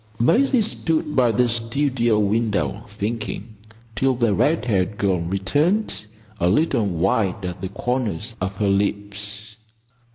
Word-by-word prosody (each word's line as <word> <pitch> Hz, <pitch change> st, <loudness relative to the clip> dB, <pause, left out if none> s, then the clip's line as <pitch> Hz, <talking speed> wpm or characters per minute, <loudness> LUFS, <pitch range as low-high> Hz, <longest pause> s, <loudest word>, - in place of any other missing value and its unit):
Maisie 245 Hz, -, +4 dB
stood 160 Hz, -7 st, -1 dB
by 125 Hz, -3 st, +4 dB
the 125 Hz, +2 st, +2 dB
studio 120 Hz, 0 st, +1 dB
window, 105 Hz, 0 st, 0 dB
thinking, 110 Hz, +2 st, -4 dB, 0.4 s
till 130 Hz, +3 st, +2 dB
the 120 Hz, -3 st, +2 dB
red 150 Hz, -, +2 dB
haired 100 Hz, -3 st, 0 dB
girl 95 Hz, -3 st, +1 dB
returned, 110 Hz, -, 0 dB, 0.3 s
a 90 Hz, -, +3 dB
little 115 Hz, -, +2 dB
white 95 Hz, +2 st, 0 dB
at 90 Hz, 0 st, -5 dB
the 95 Hz, -, -3 dB
corners 115 Hz, -1 st, -2 dB
of 95 Hz, +1 st, -2 dB
her 105 Hz, 0 st, 0 dB
lips. 100 Hz, +1 st, -2 dB
110 Hz, 130 wpm, -22 LUFS, 100-125 Hz, 0.4 s, Maisie